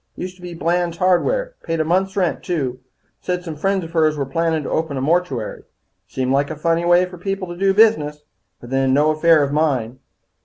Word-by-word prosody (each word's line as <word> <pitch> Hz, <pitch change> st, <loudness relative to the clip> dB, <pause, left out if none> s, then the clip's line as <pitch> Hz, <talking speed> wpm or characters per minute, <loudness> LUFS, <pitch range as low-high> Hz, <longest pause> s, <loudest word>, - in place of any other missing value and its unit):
Used 185 Hz, 0 st, -6 dB
to -, -, -19 dB
be 175 Hz, -1 st, -8 dB
Blands 170 Hz, +1 st, 0 dB
Hardware. -, -, +1 dB
Paid 165 Hz, 0 st, -3 dB
a -, -, +3 dB
month's 190 Hz, +4 st, 0 dB
rent, 180 Hz, -4 st, 0 dB
too. 135 Hz, -8 st, -2 dB, 0.4 s
Said 180 Hz, -1 st, -2 dB
some 165 Hz, -3 st, -6 dB
friends 195 Hz, +4 st, 0 dB
of 165 Hz, -, -8 dB
hers 155 Hz, -2 st, +2 dB
were 140 Hz, -, -1 dB
plannin' 160 Hz, +2 st, -1 dB
to -, -, -5 dB
open 160 Hz, -3 st, -1 dB
a -, -, -1 dB
mortuary. 140 Hz, -5 st, -1 dB, 0.5 s
Seemed 130 Hz, 0 st, -2 dB
like 140 Hz, +1 st, +1 dB
a 155 Hz, -, -4 dB
funny 165 Hz, +2 st, 0 dB
way 175 Hz, +1 st, +5 dB
for 180 Hz, -1 st, -11 dB
people 195 Hz, 0 st, -3 dB
to 175 Hz, -, -6 dB
do 195 Hz, +2 st, +2 dB
business, 155 Hz, -9 st, +3 dB, 0.4 s
but 120 Hz, -, -12 dB
then, 135 Hz, 0 st, +2 dB
no 150 Hz, +2 st, +3 dB
affair 155 Hz, 0 st, +4 dB
of 140 Hz, -, -2 dB
mine." 130 Hz, -6 st, 0 dB
165 Hz, 215 wpm, -20 LUFS, 145-180 Hz, 0.5 s, way